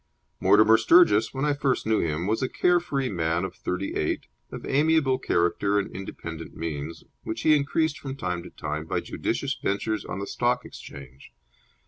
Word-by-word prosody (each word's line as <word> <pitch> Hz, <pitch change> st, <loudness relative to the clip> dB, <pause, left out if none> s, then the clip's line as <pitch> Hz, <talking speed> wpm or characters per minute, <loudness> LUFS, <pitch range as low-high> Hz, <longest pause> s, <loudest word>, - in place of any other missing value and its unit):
Mortimer 110 Hz, +1 st, +6 dB
Sturgis, 110 Hz, -, +5 dB
when 135 Hz, +2 st, -2 dB
I 150 Hz, -, +2 dB
first 140 Hz, -3 st, 0 dB
knew 110 Hz, 0 st, +2 dB
him, 80 Hz, +1 st, -1 dB
was 110 Hz, +3 st, 0 dB
a 130 Hz, -, 0 dB
care 180 Hz, 0 st, +3 dB
free 140 Hz, -6 st, -2 dB
man 85 Hz, -3 st, 0 dB
of -, -, -6 dB
thirty 90 Hz, +2 st, -3 dB
eight, -, -, -1 dB, 0.3 s
of -, -, -7 dB
amiable 145 Hz, -2 st, +2 dB
character 100 Hz, 0 st, +1 dB
and 100 Hz, -, -2 dB
independent 85 Hz, -4 st, -7 dB
means, 80 Hz, -1 st, -5 dB, 0.2 s
which 110 Hz, +1 st, -5 dB
he 155 Hz, +4 st, +5 dB
increased 150 Hz, +2 st, 0 dB
from 135 Hz, -4 st, -6 dB
time 90 Hz, -9 st, -3 dB
to 90 Hz, -, -10 dB
time 75 Hz, +1 st, -5 dB
by -, -, 0 dB
judicious -, -, -2 dB
ventures 105 Hz, +2 st, -1 dB
on -, -, -5 dB
the 100 Hz, -, -3 dB
Stock 125 Hz, +3 st, 0 dB
Exchange. 70 Hz, -1 st, -12 dB
110 Hz, 175 wpm, -26 LUFS, 85-135 Hz, 0.3 s, Mortimer